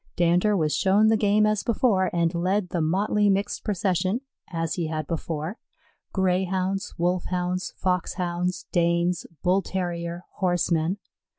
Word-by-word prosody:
Dander 180 Hz, +4 st, +3 dB
was 155 Hz, -3 st, +1 dB
shown 205 Hz, +3 st, +4 dB
the 220 Hz, -, +4 dB
game 210 Hz, 0 st, +3 dB
as 215 Hz, -1 st, +1 dB
before 210 Hz, -6 st, +2 dB
and 170 Hz, 0 st, +1 dB
led 180 Hz, +2 st, 0 dB
the 170 Hz, -, -1 dB
motley 200 Hz, +5 st, +2 dB
mixed 200 Hz, +1 st, 0 dB
procession 190 Hz, +2 st, 0 dB, 0.3 s
as 165 Hz, -2 st, -2 dB
he 170 Hz, -3 st, -2 dB
had 155 Hz, -1 st, -3 dB
before 165 Hz, +4 st, -4 dB, 0.5 s
Greyhounds, 190 Hz, +1 st, 0 dB
Wolfhounds, 180 Hz, +1 st, -1 dB
Foxhounds, 180 Hz, -1 st, -1 dB
Danes, 170 Hz, 0 st, +1 dB, 0.2 s
Bull 185 Hz, +2 st, +3 dB
terrier, 175 Hz, -2 st, -3 dB
horsemen. 175 Hz, -1 st, +1 dB
180 Hz, 125 wpm, -25 LUFS, 170-195 Hz, 0.5 s, shown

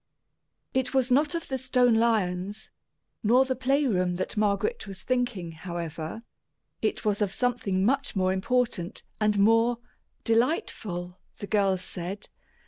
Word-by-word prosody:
It 260 Hz, 0 st, 0 dB
was 260 Hz, -1 st, +2 dB
not 290 Hz, +5 st, +3 dB
of 335 Hz, -, -4 dB
the 265 Hz, -1 st, -2 dB
stone 250 Hz, -1 st, +3 dB
lions, 205 Hz, -3 st, 0 dB, 0.5 s
nor 250 Hz, +4 st, +4 dB
the 260 Hz, 0 st, -1 dB
play 270 Hz, +4 st, +1 dB
room 180 Hz, -7 st, +1 dB
that 185 Hz, -, -3 dB
Margaret 215 Hz, -, 0 dB
was 195 Hz, -1 st, -8 dB
thinking, 245 Hz, -9 st, -1 dB
however; 165 Hz, +3 st, -6 dB, 0.6 s
it -, -, -1 dB
was 210 Hz, 0 st, +1 dB
of 205 Hz, -2 st, +1 dB
something 220 Hz, -6 st, 0 dB
much 275 Hz, +2 st, +1 dB
more 185 Hz, -1 st, +2 dB
important 210 Hz, -2 st, -1 dB, 0.2 s
and 210 Hz, -1 st, +2 dB
more 225 Hz, +4 st, +4 dB, 0.5 s
delightful, 225 Hz, -, -1 dB, 0.2 s
the -, -, -6 dB
girls 195 Hz, -3 st, +1 dB
said. 185 Hz, +4 st, -6 dB
215 Hz, 135 wpm, -27 LUFS, 185-250 Hz, 0.6 s, nor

